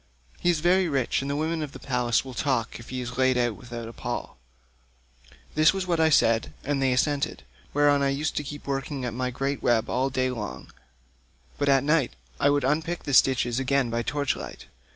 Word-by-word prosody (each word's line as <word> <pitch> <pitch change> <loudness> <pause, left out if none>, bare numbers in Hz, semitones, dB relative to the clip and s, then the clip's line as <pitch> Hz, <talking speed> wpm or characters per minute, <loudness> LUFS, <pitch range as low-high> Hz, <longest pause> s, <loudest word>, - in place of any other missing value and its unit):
He 175 - +1
is 165 -3 +2
very 180 +1 +3
rich, 135 -4 0
and 135 - -4
the 140 - -1
women 160 +2 -1
of 150 -2 -5
the - - -9
place 125 -2 0
will 130 - -8
talk 125 -4 -1
if 115 - -12
he 130 0 -3
is 125 +1 -6
laid 130 -1 +3
out 120 -2 +1
without 120 -1 -8
a 115 - -9
pall.' 65 - -5 1.1
This 155 +4 +4
was 190 -1 -2
what 170 -2 0
I 160 0 +5
said, 115 -6 +3
and 140 0 -1
they 135 -1 +3
assented; 140 +3 0 0.3
whereon 145 0 +3
I 140 - +2
used 145 +3 -1
to 150 - 0
keep 145 +1 -8
working 135 -1 -3
at 120 - -3
my 125 +1 -1
great 135 +2 -2
web 120 -1 +2
all 130 +2 +1
day 130 0 0
long, 105 - -6 0.9
but 145 -1 +1
at 135 -1 +4
night 150 -3 +2 0.2
I 140 - +4
would 145 0 +2
unpick 160 +5 0
the 145 - -3
stitches 125 -1 +4
again 135 -2 +1
by 115 0 0
torch 140 +3 -1
light. - - -8
135 Hz, 215 wpm, -26 LUFS, 125-145 Hz, 1.1 s, I